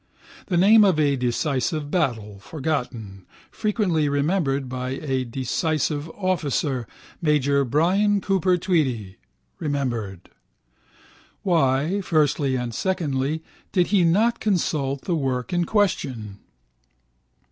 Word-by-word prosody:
The 175 - 0
name 210 +5 +7
of 185 -6 +3
a 145 -2 +3
decisive 135 +4 -1
battle 110 - -1
(forgotten), 120 - -4 0.2
frequently 190 -9 0
remembered 140 -2 0
by 130 +1 -4
a 130 -3 -1
decisive 145 +5 -1
officer, 150 - -1 0.3
major 140 -3 +2
Brian 185 - +2
Cooper 190 -2 +1
Tweedy 130 - -1 0.4
(remembered). 120 - -3 1.1
Why, 160 +1 +2
firstly 150 -5 +1
and 125 -2 -3
secondly, 155 - -1 0.3
did 180 -3 +2
he 190 -3 +5
not 210 +8 +3
consult 150 -9 -1
the 175 - -1
work 130 -2 -2
in 175 -1 +1
question? 130 - -1
145 Hz, 105 wpm, -23 LUFS, 130-175 Hz, 1.1 s, name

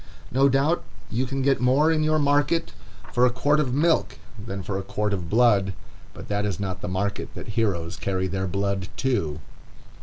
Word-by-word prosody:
No 135 +2 +4
doubt 140 +6 +2 0.3
you 125 +3 0
can 135 +1 -2
get 135 -1 +2
more 135 +6 +4
in 155 -1 +2
your 155 0 +2
market 145 +3 +2 0.4
for 120 - +3
a 125 - +6
quart 145 +5 +2
of 135 -4 0
milk 150 -1 +2 0.3
than 100 -3 -5
for 95 0 -3
a - - -2
quart 105 +2 -2
of 90 -4 -3
blood, 105 -4 +3 0.4
but - - -9
that 105 0 -1
is 100 -5 -2
not 95 -2 -4
the - - -4
market 95 +2 -2
that - - -8
heroes 100 -7 -1
carry 95 -1 -1
their 95 +1 -2
blood 100 0 -1
to. 80 - 0
115 Hz, 190 wpm, -25 LUFS, 95-135 Hz, 0.4 s, a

